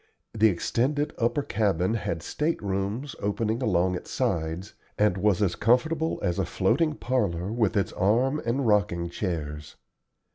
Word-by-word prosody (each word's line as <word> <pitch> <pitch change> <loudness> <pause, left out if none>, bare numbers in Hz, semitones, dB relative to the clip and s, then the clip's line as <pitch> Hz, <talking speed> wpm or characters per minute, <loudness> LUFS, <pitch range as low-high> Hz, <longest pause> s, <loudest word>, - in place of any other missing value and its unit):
The 110 0 +4
extended 140 - 0
upper 120 +4 +1
cabin 100 -4 +1
had 100 -8 -3
state 160 +2 -1
rooms 100 +8 -2
opening 110 +3 -1
along 90 -5 +2
its 90 - -6
sides, 80 +5 -2 0.2
and 105 -3 +3
was 100 0 +2
as 90 -3 +1
comfortable 160 +8 +1
as 85 - 0
a - - +1
floating 160 -2 +1
parlor 100 - -1
with 110 -2 +1
its 95 -3 0
arm 125 +9 +2
and 125 +3 0
rocking 90 -5 +2
chairs. 75 -6 -4
105 Hz, 145 wpm, -26 LUFS, 90-125 Hz, 0.2 s, The